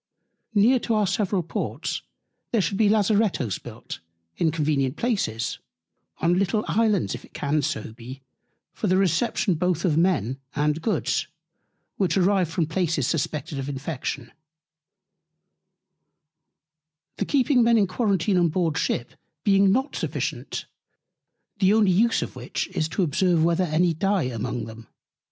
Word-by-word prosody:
Near 235 Hz, +6 st, +5 dB
to 230 Hz, -1 st, -1 dB
our 210 Hz, -1 st, +2 dB
several 195 Hz, -1 st, 0 dB
Ports, 165 Hz, -, -3 dB, 0.5 s
there 230 Hz, -, +2 dB
should 195 Hz, 0 st, 0 dB
be 215 Hz, -2 st, +4 dB
Lazarettos 205 Hz, -, +1 dB
built -, -, -9 dB, 0.4 s
in 165 Hz, -, +1 dB
convenient 145 Hz, -4 st, 0 dB
Places, 195 Hz, -, -1 dB, 0.6 s
on 175 Hz, +2 st, +2 dB
little 200 Hz, +2 st, 0 dB
Islands 215 Hz, -4 st, +1 dB
if -, -, -7 dB
it -, -, -19 dB
can 150 Hz, +1 st, 0 dB
so 110 Hz, -4 st, -3 dB
be, 125 Hz, +3 st, -10 dB, 0.5 s
for 215 Hz, -, -3 dB
the 185 Hz, 0 st, +3 dB
Reception 195 Hz, +2 st, +1 dB
both 170 Hz, +1 st, 0 dB
of 160 Hz, -4 st, +2 dB
Men 150 Hz, -, +1 dB, 0.2 s
and 150 Hz, +2 st, 0 dB
Goods, 220 Hz, -, 0 dB, 0.7 s
which 195 Hz, -1 st, +1 dB
arrive 190 Hz, -2 st, +3 dB
from 165 Hz, 0 st, 0 dB
Places 160 Hz, -3 st, 0 dB
suspected 150 Hz, 0 st, -2 dB
of 135 Hz, +1 st, -4 dB
Infection: 135 Hz, -3 st, -4 dB, 2.9 s
The -, -, -1 dB
keeping 270 Hz, -2 st, +3 dB
Men 235 Hz, 0 st, +4 dB
in 205 Hz, -, +4 dB
Quarentine 195 Hz, -1 st, +1 dB
on 170 Hz, -1 st, +3 dB
board 165 Hz, -1 st, 0 dB
the -, -, +1 dB
Ship 120 Hz, -, -2 dB, 0.3 s
being 195 Hz, -1 st, +4 dB
not 265 Hz, +7 st, 0 dB
sufficient; -, -, -3 dB, 0.9 s
the 195 Hz, +1 st, +4 dB
only 210 Hz, -4 st, +4 dB
Use 225 Hz, +6 st, +3 dB
of -, -, -8 dB
which -, -, -4 dB
is 155 Hz, 0 st, -2 dB
to 190 Hz, -, 0 dB
observe 170 Hz, +1 st, +2 dB
whether 170 Hz, +2 st, +2 dB
any 165 Hz, +2 st, +2 dB
dye 195 Hz, +2 st, +1 dB
among 120 Hz, 0 st, -3 dB
them. 115 Hz, 0 st, -11 dB
175 Hz, 145 wpm, -24 LUFS, 150-205 Hz, 2.9 s, Near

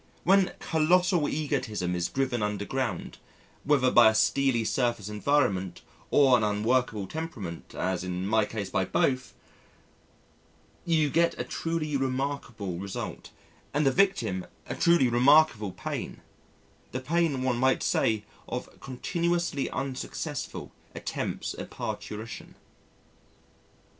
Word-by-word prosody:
When 195 Hz, 0 st, +4 dB
colossal 170 Hz, 0 st, +2 dB
egotism 125 Hz, -, -1 dB
is 85 Hz, 0 st, 0 dB
driven 130 Hz, -3 st, -1 dB
underground, 105 Hz, 0 st, -3 dB, 0.4 s
whether 140 Hz, -3 st, +3 dB
by 120 Hz, -2 st, +8 dB
a 110 Hz, -, -1 dB
steely 130 Hz, +1 st, +2 dB
surface 120 Hz, -4 st, 0 dB
environment 105 Hz, -5 st, 0 dB, 0.3 s
or 135 Hz, -3 st, +6 dB
an 115 Hz, -, +2 dB
unworkable 105 Hz, 0 st, +1 dB
temperament 105 Hz, -, -6 dB
or -, -, -4 dB
as 90 Hz, -1 st, -1 dB
in 90 Hz, 0 st, -3 dB
my 110 Hz, +1 st, +3 dB
case 105 Hz, -2 st, -5 dB
by -, -, +1 dB
both, 130 Hz, -1 st, 0 dB, 1.5 s
you 160 Hz, -4 st, +2 dB
get 170 Hz, 0 st, +2 dB
a -, -, 0 dB
truly 165 Hz, -3 st, -2 dB
remarkable 130 Hz, -8 st, -3 dB
result, 100 Hz, 0 st, -6 dB, 0.5 s
and 150 Hz, 0 st, +2 dB
the 135 Hz, -, +5 dB
victim 120 Hz, -, +1 dB, 0.2 s
a -, -, -4 dB
truly 170 Hz, -6 st, +4 dB
remarkable 120 Hz, -3 st, +4 dB
pain -, -, -5 dB, 0.7 s
the 130 Hz, -, -1 dB
pain 145 Hz, -1 st, 0 dB
one 125 Hz, -2 st, 0 dB
might 130 Hz, +1 st, +2 dB
say 110 Hz, -2 st, +1 dB, 0.2 s
of -, -, -6 dB
continuously 170 Hz, +2 st, -1 dB
unsuccessful 135 Hz, -2 st, -4 dB, 0.2 s
attempts -, -, -3 dB
at -, -, -6 dB
parturition. 110 Hz, +2 st, -6 dB
130 Hz, 120 wpm, -28 LUFS, 105-150 Hz, 1.5 s, by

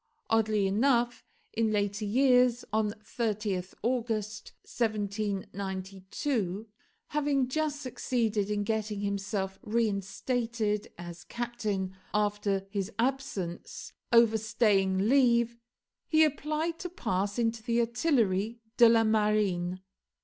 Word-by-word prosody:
Oddly 215 Hz, -2 st, +3 dB
enough, 240 Hz, +4 st, +2 dB, 0.3 s
in 225 Hz, -1 st, +1 dB
later 205 Hz, 0 st, 0 dB
years, 250 Hz, +1 st, +4 dB
on 215 Hz, -1 st, +1 dB
30th 210 Hz, -5 st, -2 dB
August 225 Hz, -3 st, -2 dB
1792, 200 Hz, 0 st, -3 dB, 0.4 s
having 285 Hz, -3 st, +1 dB
just 295 Hz, +1 st, -1 dB
succeeded 225 Hz, -5 st, -1 dB
in 205 Hz, -1 st, 0 dB
getting 215 Hz, -1 st, -2 dB
himself 195 Hz, -1 st, -2 dB
reinstated 215 Hz, 0 st, -1 dB
as 175 Hz, -1 st, -8 dB
captain 210 Hz, -6 st, -3 dB, 0.2 s
after 205 Hz, -2 st, 0 dB
his 200 Hz, 0 st, -2 dB
absence, 230 Hz, -9 st, -3 dB, 0.2 s
overstaying 215 Hz, -4 st, +3 dB
leave, 235 Hz, -3 st, +3 dB, 0.5 s
he 315 Hz, -1 st, +5 dB
applied 310 Hz, +2 st, -1 dB
to 360 Hz, -, -4 dB
pass 200 Hz, -, -2 dB
into 230 Hz, -1 st, 0 dB
the 235 Hz, +1 st, 0 dB
Artillerie 235 Hz, -, +1 dB, 0.2 s
de 235 Hz, -1 st, +8 dB
la 230 Hz, 0 st, +5 dB
Marine. 210 Hz, -5 st, +1 dB
215 Hz, 100 wpm, -29 LUFS, 200-240 Hz, 0.5 s, de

